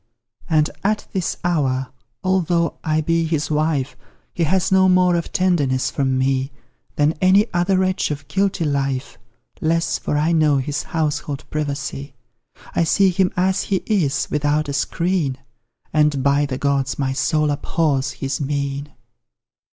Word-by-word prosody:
And 155 -2 +3 0.2
at 210 +2 0
this 185 -3 -1
hour 135 -7 0 0.3
although 175 -3 +1
I 155 0 +1
be 165 +2 +1
his 155 -2 -1
wife 150 -3 0 0.4
He 170 - 0
has 185 +4 +1
no 190 0 +5
more 180 -1 +4
of 170 - -2
tenderness 145 -9 +1
from 135 -2 0
me 135 +1 0 0.4
Than 150 +2 +2
any 190 +3 +5
other 180 +2 +2
wretch 185 0 +1
of 145 -1 -5
guilty 195 -3 0
life; 135 -3 -2 0.4
Less, 165 +1 +1
for 145 - -1
I 155 +3 +2
know 155 -3 +3
his 145 +2 -2
household 150 -3 -3
privacy 140 -2 -4 0.6
I - - +2
see 190 +3 +3
him 180 +1 +1
as 190 +2 +1
he 195 -2 -1
is 165 -11 +1
without 150 +1 +1
a 140 - -3
screen; 165 -1 0 0.6
And, 150 -3 +2
by 140 +1 +2
the 130 -2 -3
gods, 140 -1 0
my 135 -1 -1
soul 150 +3 +1
abhors 145 -2 0
his 135 +1 -3
mien! 140 0 -3
150 Hz, 150 wpm, -21 LUFS, 140-175 Hz, 0.6 s, no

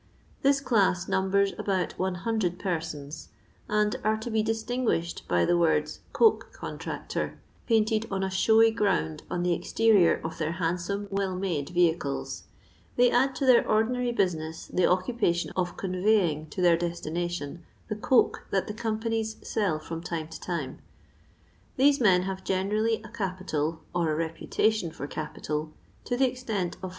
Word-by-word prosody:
This 275 0 +3
class 195 -8 +2
numbers 195 +1 +2
about 190 -3 -1
100 185 0 -1
persons, 155 -5 -4 0.4
and 210 0 +2
are 215 +1 +2
to 220 +2 -6
be 220 0 +2
distinguished 225 -5 -1
by 90 -1 +2
the 175 - +3
words 160 -3 +1
" - - -32
coke 450 -2 +3
contractor," - - -5 0.3
painted 220 -1 +2
on 195 -1 -1
a 190 - 0
showy 220 +4 +5
ground 195 -8 0
on 175 -1 -1
the 175 -1 +2
exterior 210 0 +3
of 160 0 -5
their 155 0 -1
handsome 180 +4 -2
well 195 -1 -1
msde 175 -7 -2
vehicles; 170 -5 0 0.5
they 245 0 +5
add 265 +2 +2
to 275 - -1
their 255 -2 +6
ordinary 240 +3 +2
business 165 -7 -1
the 180 - +1
occupation 185 -2 +1
of 180 -1 -2
conveying 185 -5 +1
to 180 - -3
their 170 -1 +5
destination 170 -1 -3 0.2
the 215 - -3
coke 245 +4 +2
that 190 -1 0
the 210 - -5
companies 225 0 -2
sell 200 -8 0
from 165 +1 -6
time 165 -2 -4
to 160 - -8
time. 165 -7 -4 1.0
These 280 +1 +4
men 185 -5 +5
have 190 0 -4
generally 210 +4 0
a 225 - -10
capital, 185 -7 -3
or 170 -3 +1
a - - 0
reputation 165 +5 0
for 155 -3 -7
capital, 155 +1 -4 0.3
to 245 - -1
the 265 - +4
extent 225 -8 -3
of - - -25
400 185 - -4
190 Hz, 155 wpm, -27 LUFS, 170-220 Hz, 1.0 s, their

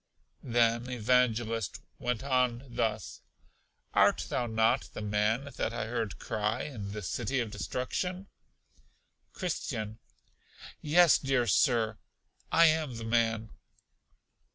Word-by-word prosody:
Then 120 0 +1
Evangelist 120 -2 +1 0.2
went 125 0 -2
on 125 -2 +1
thus: 110 -3 -2 0.7
Art - - +3
not 120 - 0
thou 110 +3 +5 0.2
the - - -4
man 105 +6 0
that 115 - -1
I 115 - -2
heard 110 -5 -3
cry 110 +2 -2
in 105 -9 -6
The 105 0 -6
City 120 +8 -1
of 115 -3 -2
Destruction? 180 - -3 1.1
Christian. 115 - -4 0.8
Yes, 170 +2 +5
dear 135 -3 +1
Sir, 115 -1 +2 0.5
I 165 - +6
am 155 -5 +2
the 115 - -6
man. 115 -1 +1
120 Hz, 110 wpm, -30 LUFS, 110-130 Hz, 1.1 s, I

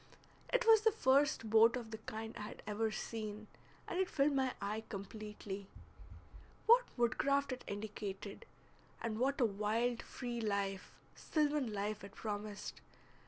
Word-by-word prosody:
It - - +3
was 445 -2 +8
the 445 0 +5
first 275 - +3
boat 225 +2 +6
of 235 -3 -5
the 220 - -5
kind 220 +1 -6
I - - -6
had 210 - -7
ever 215 +2 0
seen, 215 -1 -4 0.4
and 355 - -2
it 380 - +2
filled 285 0 +3
my 265 -2 +2
eye 210 +2 -2
completely. 200 -1 -6 1.0
What 485 +2 +7
woodcraft 275 +4 +2
it 255 - -4
indicated, 205 -1 -5 0.5
and 220 -1 -2
what 275 +4 +2
a 245 - +5
wild 225 +3 0
free 240 -2 -5
life, 200 -3 -1 0.2
sylvan 295 -5 +1
life, 210 0 -2
it 200 +1 -10
promised! 210 -1 -5
220 Hz, 145 wpm, -36 LUFS, 210-265 Hz, 1.0 s, was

